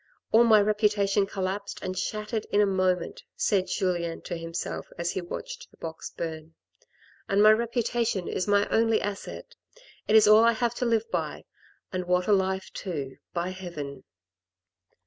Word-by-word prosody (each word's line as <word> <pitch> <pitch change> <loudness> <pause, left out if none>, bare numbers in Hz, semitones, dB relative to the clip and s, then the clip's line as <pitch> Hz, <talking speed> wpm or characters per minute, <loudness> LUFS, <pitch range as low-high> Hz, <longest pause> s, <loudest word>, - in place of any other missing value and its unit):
" - - -47
All 230 +2 +7
my 220 -2 +7
reputation 205 -1 +2
collapsed 195 +1 -3
and 185 - -3
shattered 215 +3 -3
in 205 - +3
a 210 - +6
moment," 185 -2 0
said 190 -3 +1
Julien 175 -3 -1
to 175 - -4
himself 165 0 -5
as 170 0 -1
he 185 - -3
watched 485 - -7
the - - -24
box 160 -1 -7
burn, 160 -1 -6 0.7
"and 200 +1 +4
my 215 - +9
reputation 235 -3 0
is 185 - -2
my 205 0 +3
only 225 0 +3
asset. 200 -1 -6 0.5
It 215 - +3
is 215 -1 +7
all 215 +1 +8
I 235 0 +5
have 235 +1 0
to 250 - -1
live 230 -1 +1
by - - -3 0.2
— - - -32
and 185 -1 -2
what 180 0 +2
a 210 - +3
life 190 -1 0
to, 145 -8 -5 0.2
by 175 +1 -1
heaven 155 -8 -7
195 Hz, 170 wpm, -27 LUFS, 180-215 Hz, 0.7 s, my